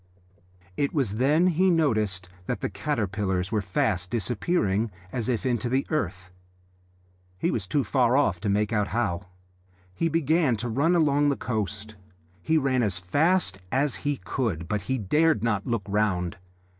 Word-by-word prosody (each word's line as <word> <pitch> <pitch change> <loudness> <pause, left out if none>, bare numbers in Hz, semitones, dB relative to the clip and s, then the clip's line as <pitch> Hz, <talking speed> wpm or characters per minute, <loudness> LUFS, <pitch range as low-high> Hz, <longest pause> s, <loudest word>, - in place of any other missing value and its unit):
It 140 +3 0
was 115 -8 0
then 150 +8 +3
he 185 +1 +3
noticed 110 - +1 0.2
that - - -2
the - - -2
caterpillars 100 -8 -1
were 110 -2 +1
fast 90 -1 -1
disappearing, 115 - 0 0.2
as 120 -2 -2
if 125 +1 -1
into 120 -2 0
the 135 +2 +1
earth: 90 - -2 1.1
he - - 0
was 95 -4 -3
too 140 +8 +1
far 125 +1 +2
off 105 -12 +2
to 100 - -2
make 105 +2 +1
out 105 -2 +1
how. 95 -6 -2 0.7
He 165 - 0
began 160 -4 +2
to 120 +3 -3
run 145 +10 +2
along 145 -3 +3
the 140 - 0
coast. 105 -1 -4 0.4
He 160 - +2
ran 135 -4 +2
as 100 -5 0
fast 95 - +1
as 135 +1 +1
he 145 -1 -2
could, 95 - -3
but 105 +3 -1
he 130 - +1
dared 150 - +2
not 105 -4 0
look 115 -4 -1
round. 100 -4 0
115 Hz, 160 wpm, -26 LUFS, 100-145 Hz, 1.1 s, then